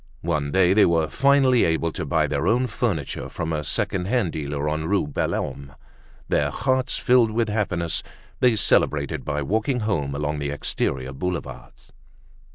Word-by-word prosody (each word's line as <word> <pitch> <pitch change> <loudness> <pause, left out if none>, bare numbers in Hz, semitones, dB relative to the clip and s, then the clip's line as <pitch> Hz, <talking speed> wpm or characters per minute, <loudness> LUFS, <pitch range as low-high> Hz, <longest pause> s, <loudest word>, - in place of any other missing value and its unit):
One 75 -4 -1
day 90 +2 +4
they 105 +1 +5
were 80 -2 +2
finally 135 -2 +4
able 80 0 +1
to 75 - -5
buy 75 +2 +2
their 70 -1 -1
own 125 +3 +3
furniture 105 - -3
from 80 0 -4
a 75 -1 -2
second 90 +5 -1
hand 105 -4 0
dealer 75 -1 -3
on 75 +1 -1
Rue 100 -1 +1
Belhomme. 70 -1 -3 0.5
Their - - +1
hearts 130 0 0
filled 125 -2 +4
with 110 0 0
happiness, 90 -6 -1 0.4
they 125 -3 +4
celebrated 75 -7 +1
by 75 -1 -2
walking 110 - 0
home 75 -10 -1
along 75 +1 -2
the 70 0 -2
exterior 65 -2 -2
Boulevards. 90 +4 -6
85 Hz, 160 wpm, -23 LUFS, 75-110 Hz, 0.5 s, they